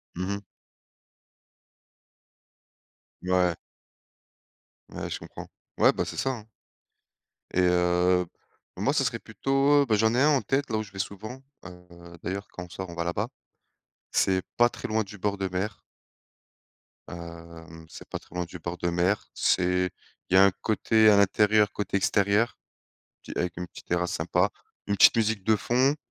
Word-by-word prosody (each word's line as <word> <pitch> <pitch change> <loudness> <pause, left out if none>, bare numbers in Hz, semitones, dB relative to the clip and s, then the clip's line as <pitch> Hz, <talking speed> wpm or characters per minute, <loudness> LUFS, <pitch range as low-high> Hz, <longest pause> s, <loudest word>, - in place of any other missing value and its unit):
Mmh 90 +2 -3
mh. 100 - -7 2.8
Ouais. 90 -2 +2 1.3
Ouais, - - -6
je - - -4
comprends. - - -10 0.3
Ouais, - - +6
ben, - - -1
c'est - - -7
ça, 135 - 0
hein. 115 -4 -8 1.1
Et 90 - +3
heu, 90 0 +3 0.5
moi 105 +10 0
ça 140 - +2
serait 115 -2 -1
plutôt, 135 +6 +2
bah, 110 -4 +2
j'en 110 +2 +3
ai 125 - +2
un 150 - +5
en 140 -3 +3
tête 135 0 -1
là 110 - 0
où 110 - -1
je 100 - -14
vais 95 - -9
souvent, 110 +6 -5 0.2
heu, 90 -1 -12 0.4
d'ailleurs 100 +2 -4
quand 90 - -7
on - - -17
sort, 95 +1 -7
on 85 - -8
va 85 - -2
là-bas. 95 +6 -1 0.8
C'est 95 -1 +2 0.2
pas 120 0 +5
très - - -7
loin 110 0 +1
du 105 +1 -11
bord 100 +1 -1
de 95 -1 -1
mer. 95 +3 -3 1.3
Hem, 85 -1 -10
c'est - - -11
pas - - -4
très - - -18
loin 90 0 -1
du 85 +2 -10
bord 85 +2 -5
de 90 - -1
mer, 90 +4 0
c'est 90 0 +1 0.4
il - - -2
y - - +7
a 95 - +8
un 100 - +6
côté 110 0 +3
à 105 - +6
l'intérieur, 105 +1 +4
côté 100 -1 -3
extérieur, 100 +3 +2 0.7
petit - - -9
avec 90 -1 -2
une 90 +1 -4
petite - - -14
terrasse 90 0 0
sympa, 90 +4 +1 0.4
une 100 - 0
petite 95 - +7
musique 110 -2 +1
de 110 +2 +3
fond. 130 +7 +2
100 Hz, 170 wpm, -27 LUFS, 90-110 Hz, 2.8 s, a